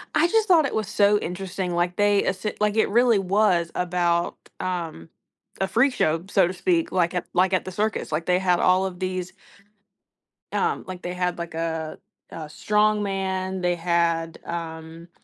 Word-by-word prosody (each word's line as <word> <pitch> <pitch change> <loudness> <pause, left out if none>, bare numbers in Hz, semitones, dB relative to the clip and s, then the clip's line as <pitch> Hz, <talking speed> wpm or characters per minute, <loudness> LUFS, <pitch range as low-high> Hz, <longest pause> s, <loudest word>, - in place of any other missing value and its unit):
I 320 +3 +4
just 440 +3 +2
thought 330 -5 +5
it 255 - -3
was 215 -3 -1
so 205 +1 +3
interesting, 185 0 -4
like, 175 +1 0
they 205 -1 +3
esse 190 +2 -2
like, 210 0 +1
it 220 - +3
really 235 -1 +4
was 185 -3 +2
about, 175 -1 0 0.2
um, 170 - -4 0.5
a 190 - +2
freak 250 +5 +3
show, 160 +3 0
so 190 -4 +4
to 185 - -4
speak, 335 - 0
like 175 -1 +1
at 180 - -2
like 185 +1 +2
at 185 - +1
the 185 - -5
circus, 210 -2 -2
like, 155 +2 -1
they 180 0 +2
had 180 -2 +2
all 185 +1 +3
of 180 -1 -5
these 185 -1 -3 1.2
Um, 445 -1 0
like, 185 0 -7
they 180 - -4
had, 180 -1 -1
like, 170 -1 -6
a 160 -1 -3 0.3
a 155 -2 -6
strong 210 +3 +1
man. 190 -1 -2
They 175 0 +1
had, 170 -1 0
um 165 0 -7
185 Hz, 180 wpm, -24 LUFS, 170-205 Hz, 1.2 s, thought